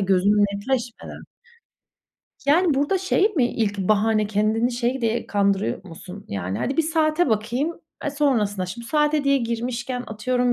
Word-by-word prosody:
gözümü 195 +1 +3 0.2
netleşmeden. 235 +3 -4 1.2
Yani, 320 +1 +4
burada 290 +8 +1
şey 380 +2 +2
mi, 265 - +4
ilk 210 -4 -2
bahane 215 +2 +2
kendini 215 +4 +1
şey 245 +2 -1
diye 230 0 -1
kandırıyor 200 -1 0
musun? 185 +3 -10
Yani, 95 0 -3
hadi 270 - -2
bir 325 - +4
saate 315 0 +1
bakayım, 240 +10 -1 0.2
eee, 290 - 0
sonrasına 220 -10 0
şimdi 235 +6 -7
saate 300 +1 +1
diye 275 0 +4
girmişken, 245 +1 -3
atıyorum 245 +3 0
235 Hz, 145 wpm, -23 LUFS, 205-280 Hz, 1.2 s, Yani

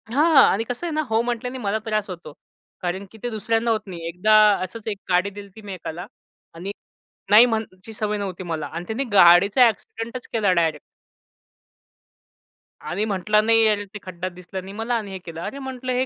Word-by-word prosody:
हां 300 +6 +3
आणि 215 - 0
कसं 245 +8 -5
आहे - - -3
ना 310 - +1
हो 225 +1 +2
म्हटल्याने 245 +1 -3
मला 215 -3 -1
त्रास 215 -2 -1
होतो. 170 -4 -8 0.5
कारण 185 +2 -3
की 220 - -14
ते 245 - -1
दुसऱ्यांना 225 +1 0
होत 220 - +1
नाही, 170 -3 -7
एकदा 180 +6 +1 0.3
असच 205 +5 -8
एक 210 -2 -2
गाडी 180 +2 +2
दिलेली 200 +1 -12
मी 205 -2 -7
एकाला 175 -1 -7 0.5
आणि 180 +4 -5 0.6
नाही 215 +4 +9
म्हणायची 220 -3 -4
सवय 210 -1 -2
नव्हती 190 -3 -5
मला 165 -4 -3
आणि 170 +3 -6
त्याने 225 +5 -2
गाडीचा 195 +5 +7
ॲक्सिडेंटच 225 +3 -5
केला 210 -4 +2
डायरेक्ट 165 -3 +1 2.1
आणि 195 +4 -1
म्हटला, 210 +1 +2
"नाही 225 +1 +4
यार, 210 -1 +2
ते 210 - -6
खड्डाचं 185 0 -6
दिसलं 180 +1 -7
नाही 195 +1 -9
मला" 225 +3 -2
आणि 210 -3 -6
हे 190 - -5
केलं. 165 -2 -9
अरे 275 - -5
म्हटलं 260 -1 -5
हे 255 +1 +1
210 Hz, 185 wpm, -23 LUFS, 185-225 Hz, 2.1 s, नाही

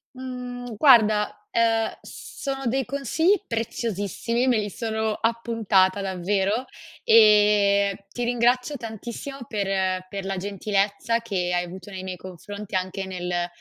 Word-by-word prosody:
Mhmm, 250 -2 -6
guarda, 215 -6 +4
ehm, 225 -1 +2
sono 270 -1 -6
dei 260 +2 0
consigli 310 - +1
preziosissimi, 230 +1 -2
me 245 - +4
li 210 -1 -1
sono 220 +1 -2
appuntata 220 -4 +1
davvero, 195 +5 0 0.4
e 205 -2 +5
ti 245 - -3
ringrazio 245 +4 +1
tantissimo 235 +4 -7
per 190 -3 -1
per 195 -1 -5
la 195 -1 -2
gentilezza 200 +3 0
che 185 -6 -2
hai 175 0 +1
avuto 185 +3 -10
nei 185 -1 -6
miei 185 -1 -5
confronti, 195 +3 -8
anche 185 +1 -2
nel 180 -2 -2
210 Hz, 125 wpm, -24 LUFS, 195-235 Hz, 0.4 s, e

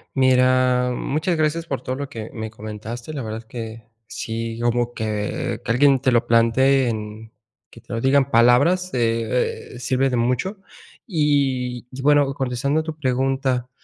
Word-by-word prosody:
Mira, 130 -1 +3
muchas 155 +7 -1
gracias 160 +2 0
por 135 - -3
todo 130 - -3
lo 140 0 -5
que 110 -4 -7
me 110 -1 -5
comentaste. 110 +5 -7
La 140 - -4
verdad 110 -1 -5
es 115 - -15
que 115 -1 -7 0.2
sí, 115 0 -5
como 120 0 0
que 105 -2 -3
que - - -2
alguien 135 +2 +4
te 130 -1 +2
lo 120 -1 +2
plantee 125 +3 +3
en 110 0 -6 0.4
que - - -15
te - - -10
lo 115 - -2
diga 135 +3 +3
en 135 - +4
palabras, 140 +11 +4
eh 115 0 -1
eh, 125 - -9
sirve 130 +1 +1
de 125 - -1
mucho. 125 - 0 0.5
Y, 135 - 0
y 130 +1 -7
bueno, 145 -1 +3
contestando 135 +3 -1
a - - -2
tu 160 -1 -5
pregunta, 130 -2 0
125 Hz, 175 wpm, -22 LUFS, 115-135 Hz, 0.5 s, alguien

